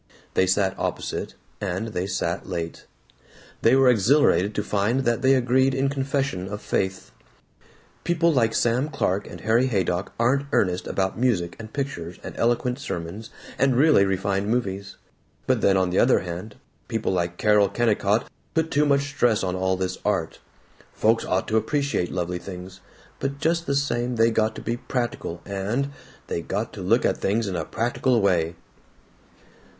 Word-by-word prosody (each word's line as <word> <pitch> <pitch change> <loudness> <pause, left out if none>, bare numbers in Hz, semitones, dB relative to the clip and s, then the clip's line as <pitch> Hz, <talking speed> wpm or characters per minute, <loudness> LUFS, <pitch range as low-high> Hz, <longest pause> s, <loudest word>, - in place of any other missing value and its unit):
They 95 - +3
sat 95 +1 +2
opposite, - - -3 0.3
and 100 +3 -2
they 95 -3 -3
sat 90 -2 -2
late. 85 -2 -5 0.7
They 115 +3 +5
were 135 -1 +5
exhilarated 115 -3 +4
to 105 - 0
find 105 +6 +1
that 120 -3 0
they 135 +1 +5
agreed 130 +1 +2
in 135 +1 +1
confession 135 -8 -1
of 105 +1 -5
faith: 95 -2 -2 0.9
"People 170 -1 +2
like 115 -4 +2
Sam 125 +5 +1
Clark 105 -9 -1
and - - -9
Harry 115 +4 +3
Haydock 95 -5 -1
aren't 135 +4 +2
earnest 90 -2 +1
about 95 +2 -1
music 105 -9 +1
and 110 -1 -9
pictures 110 - -4
and - - -7
eloquent 120 +2 0
sermons 95 -2 -5 0.3
and 135 -2 +3
really 145 -5 +5
refined 95 +1 0
movies, 100 -5 -2 0.5
but - - +1
then, 95 -1 +4
on 95 -1 +1
the 90 - +2
other 125 - +4
hand, 90 +4 -6 0.3
people 115 -3 -1
like 85 -1 -1
Carol 105 -2 +4
Kennicott 105 -1 +1 0.3
put 160 0 +1
too 150 +1 +3
much 140 -1 +3
stress 120 -6 +1
on 90 -1 -1
all 95 0 0
this 95 0 -3
art. 95 -6 -1 0.6
Folks 115 +1 +2
ought 95 - 0
to 110 - +1
appreciate 140 - 0
lovely 90 -1 -2
things, 90 +1 -9 0.4
but 140 0 -2
just 170 +3 0
the 140 - +1
same, 125 -3 0
they 115 0 +4
got 110 0 +1
to - - -8
be 115 +1 -2
practical 120 -9 -4
and 105 +8 -2 0.3
they 85 - -3
got 105 +7 -3
to 105 - -7
look 110 +7 +2
at - - +1
things 105 +2 0
in 95 - -3
a 80 - -1
practical 120 - 0
way." 85 -5 +1
110 Hz, 165 wpm, -24 LUFS, 95-130 Hz, 0.9 s, They